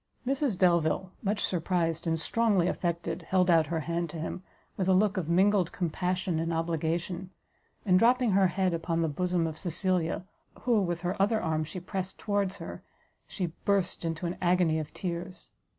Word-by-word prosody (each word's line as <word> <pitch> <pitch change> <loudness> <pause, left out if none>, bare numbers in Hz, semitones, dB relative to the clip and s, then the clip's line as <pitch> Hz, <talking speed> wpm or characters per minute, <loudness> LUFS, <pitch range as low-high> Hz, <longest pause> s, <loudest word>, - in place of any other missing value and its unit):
Mrs 270 -5 0
Delvile, 175 0 +2
much 205 0 0
surprised, 170 -2 -1
and 165 0 +1
strongly 205 -1 +2
affected, 170 -1 -2
held 180 +2 +2
out 165 -3 +4
her 165 0 -1
hand 170 +1 -2
to 165 - -7
him, 165 +3 -4 0.3
with 185 - -1
a 190 - +5
look 205 +1 +3
of 175 -5 -2
mingled 190 +1 +3
compassion 180 0 -1
and 165 +1 -1
obligation, 170 +2 -2 0.6
and 185 -2 +5
dropping 245 +1 +4
her 195 0 +5
head 185 0 0
upon 165 0 0
the - - +2
bosom 175 +2 0
of 160 -1 -4
Cecilia, 180 -1 -1 0.4
who 235 -4 +3
with 175 -2 -2
her 185 +3 -1
other 215 +2 +3
arm 160 -4 0
she 155 +4 -6
pressed 185 +1 -4
towards 200 -2 -1
her, - - -8 0.5
she 175 -5 -3
burst 195 -4 +1
into 165 +1 -3
an 170 - -3
agony 175 -3 +3
of 155 - -5
tears. 175 0 -5
180 Hz, 175 wpm, -29 LUFS, 165-190 Hz, 0.6 s, a